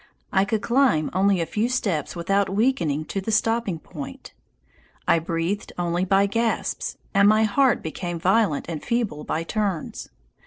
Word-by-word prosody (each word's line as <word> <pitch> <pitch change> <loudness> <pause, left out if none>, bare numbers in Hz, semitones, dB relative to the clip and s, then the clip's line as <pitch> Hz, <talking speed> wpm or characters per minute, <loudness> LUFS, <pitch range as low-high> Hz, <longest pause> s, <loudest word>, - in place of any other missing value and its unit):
I 190 0 +4
could 215 +1 -1
climb 240 - +2
only 195 0 +3
a - - 0
few 215 +8 -1
steps 185 - -1
without 195 +3 +1
weakening 190 - +1
to 195 - -3
the 190 - -5
stopping 220 -3 +1
point. 150 -3 -9 0.7
I 170 - +4
breathed 165 +5 -3
only 175 +1 0
by 195 +1 +4
gasps, 230 +3 -1 0.2
and 200 0 +5
my 215 +1 +4
heart 250 +4 +2
became 175 +2 -4
violent 185 -2 +2
and 160 -3 -5
feeble 230 -11 -1
by 160 - -2
turns. 195 -2 -3
195 Hz, 155 wpm, -24 LUFS, 165-220 Hz, 0.7 s, and